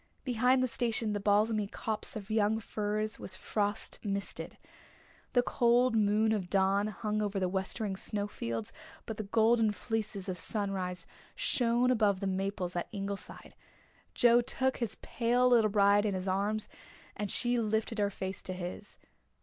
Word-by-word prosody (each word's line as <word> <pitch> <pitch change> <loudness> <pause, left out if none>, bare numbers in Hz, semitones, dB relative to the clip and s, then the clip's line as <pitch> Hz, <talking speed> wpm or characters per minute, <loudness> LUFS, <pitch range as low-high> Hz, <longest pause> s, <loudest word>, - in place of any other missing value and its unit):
Behind 250 +1 +3
the - - +2
station 230 -3 -1
the 205 - -1
balsamy 210 +1 +2
copse 215 0 -3
of 215 0 -6
young 215 0 +2
firs 215 0 -2
was 185 - -6
frost 205 +1 -1
misted. 200 -2 -3 0.8
The 245 - +4
cold 240 0 +3
moon 215 +1 +3
of 195 -5 -1
dawn 195 +2 +2
hung 215 +1 -2
over 205 -1 -1
the 185 - +1
westering 190 +2 -2
snow 205 0 -3
fields 115 - -4 0.3
but 220 - -5
the 215 - -4
golden 225 0 +4
fleeces 210 -1 -3
of 180 -1 -3
sunrise 185 -4 -2 0.3
shone 250 - +2
above 210 -5 +2
the 195 - -3
maples 190 -1 -2
up - - +1
at - - -5
Ingleside. 200 -2 -6 0.6
Joe 240 0 +6
took 260 +2 -1
his 230 -4 -3
pale 245 +1 +2
little 230 -3 +5
bride 205 0 +4
in 200 - -1
his 185 +1 -4
arms 205 +3 0 0.5
and 205 -1 -3
she 240 +3 +1
lifted 220 0 -1
her 205 -1 +2
face 190 -1 -5
to 185 - -5
his. 180 +3 -7
210 Hz, 160 wpm, -31 LUFS, 195-225 Hz, 0.8 s, Joe